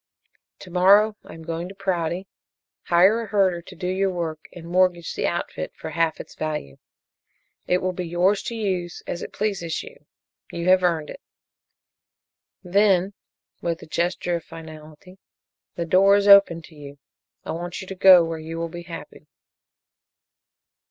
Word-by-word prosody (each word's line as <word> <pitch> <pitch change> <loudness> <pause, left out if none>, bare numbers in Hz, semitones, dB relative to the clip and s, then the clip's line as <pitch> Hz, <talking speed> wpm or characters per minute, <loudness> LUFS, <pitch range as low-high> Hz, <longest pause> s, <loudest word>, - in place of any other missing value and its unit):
"To 180 - -11
morrow 200 +4 +5
I - - -12
am 165 - -11
going 165 +2 -4
to 195 - -11
Prouty, 180 -2 -2 0.6
hire 190 +7 +4
a 225 - -6
herder 190 -4 +1
to - - -13
do - - -7
your 190 +2 0
work 165 -4 -4
and 170 -2 -11
mortgage 175 -1 +1
the - - -1
outfit 80 - -4
for 160 - -7
half 165 -1 0
its - - -9
value. 150 - -5 0.9
It 180 0 +1
will 185 - 0
be 180 -1 -5
yours 180 +4 +2
to 235 - -4
use 185 -5 -3
as 175 - -5
it - - -7
pleases 195 -6 -2
you. 485 +2 -15 0.4
You 170 +1 -2
have 185 0 +6
earned 165 -4 0
it. - - -11 1.4
Then," 195 0 +2 0.5
with 170 -1 -3
a - - -9
gesture 175 +1 -1
of 165 - -10
finality, 160 +3 -12 0.6
"the 170 - -3
door 195 +4 +5
is 205 0 +2
open 200 -5 +7
to 160 - -15
you. 145 -1 -11 0.5
I - - -4
want 175 +1 -5
you 190 - -7
to 195 - -7
go 185 -2 +7
where 165 -1 -4
you 160 +1 -7
will 165 0 -3
be 175 +1 -8
happy." 165 -3 -10
175 Hz, 165 wpm, -23 LUFS, 165-190 Hz, 1.4 s, open